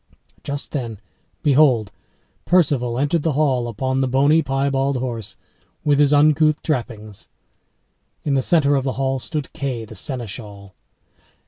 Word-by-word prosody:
Just 140 0 -4
then, 115 -8 -4 0.4
behold, 130 -8 +3 0.5
Perceval 140 -9 +2
entered 145 +4 +1
the 160 0 0
hall 130 -4 +1
upon 130 +4 -1
the 135 - +1
bony, 140 +5 +3
piebald 135 -1 0
horse, 115 -5 -4 0.5
with 145 -1 +2
his 145 -1 +4
uncouth 155 +1 +3
trappings. 110 -8 -4 1.0
In 145 - 0
the 135 - +2
centre 145 0 +3
of 135 -2 +1
the 130 -1 -1
hall 135 0 -1
stood 150 +1 -5
Kay 125 -5 -4
the 110 - -12
Seneschal. 105 -4 -4
135 Hz, 135 wpm, -21 LUFS, 120-145 Hz, 1.0 s, his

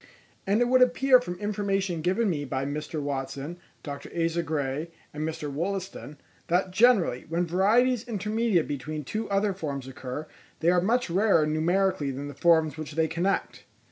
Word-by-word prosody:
And 205 +4 +2
it 245 - +3
would 255 +1 +4
appear 255 +1 +5
from 180 -8 -5
information 195 -4 -1
given 190 +7 +1
me 155 -6 -1
by 135 -1 -2
Mr. 150 +2 -4
Watson, 140 +3 -4 0.2
Dr. 140 -2 -7
Asa 165 +1 +1
Gray, 150 0 -2 0.2
and 150 - -5
Mr. 155 -2 -5
Wollaston, 180 -1 -4 0.3
that 180 +2 +1
generally, 195 - +3
when 170 +2 0
varieties 225 +8 +2
intermediate 210 -4 0
between 150 +2 -4
two 215 - -4
other 200 0 +1
forms 140 -7 -5
occur, 135 +2 -6 0.3
they 165 +2 +3
are 180 -1 +3
much 230 +1 +1
rarer 190 -4 +4
numerically 160 0 +1
than 140 +2 -5
the - - -7
forms 160 +1 +3
which 155 -1 -6
they 160 +1 +1
connect. 175 +5 -2
170 Hz, 165 wpm, -27 LUFS, 150-200 Hz, 0.3 s, appear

